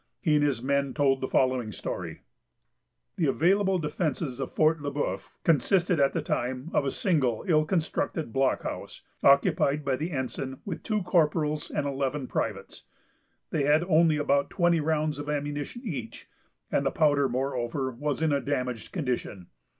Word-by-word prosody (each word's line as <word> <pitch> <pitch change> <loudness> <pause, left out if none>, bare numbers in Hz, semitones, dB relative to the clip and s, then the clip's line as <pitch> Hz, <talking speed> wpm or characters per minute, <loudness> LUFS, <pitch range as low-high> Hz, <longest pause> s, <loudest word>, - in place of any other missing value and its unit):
He 160 -5 +1
and 150 -1 +4
his 135 -5 0
men 140 0 0
told 135 -3 +2
the 130 - -1
following 130 -5 +1
story:—— - - -5 1.0
The 160 - +2
available 190 +7 +3
defences 150 -4 -2
of 135 - -3
Fort 155 0 +2
Le 145 0 -3
Bœuf 100 -10 -3
consisted, 175 +2 +2
at 140 -1 +3
the - - -1
time, 130 +6 -2
of - - +2
a - - +1
single 135 - 0
ill 155 -3 +4
constructed 160 - -2
blockhouse, 135 0 -1 0.2
occupied 140 +1 +3
by 135 -2 +1
the 160 +5 -3
ensign, 130 -2 -4
with 200 - -5
two 215 -3 -1
corporals 155 -3 +1
and 145 - -2
eleven 140 0 -2
privates. - - -4 0.7
They 145 -3 +1
had 150 +3 +4
only 165 -3 +4
about 140 -1 +1
twenty 175 -2 +2
rounds 155 -1 0
of 145 0 -5
ammunition 145 - -3
each; 130 - -6 0.4
and 140 - +2
the 135 - +2
powder, 145 -3 +2
moreover, 130 +1 -2
was 145 +5 -2
in 160 - +2
a 140 - +1
damaged 125 -5 -3
condition. 125 - -3
145 Hz, 160 wpm, -27 LUFS, 135-160 Hz, 1.0 s, and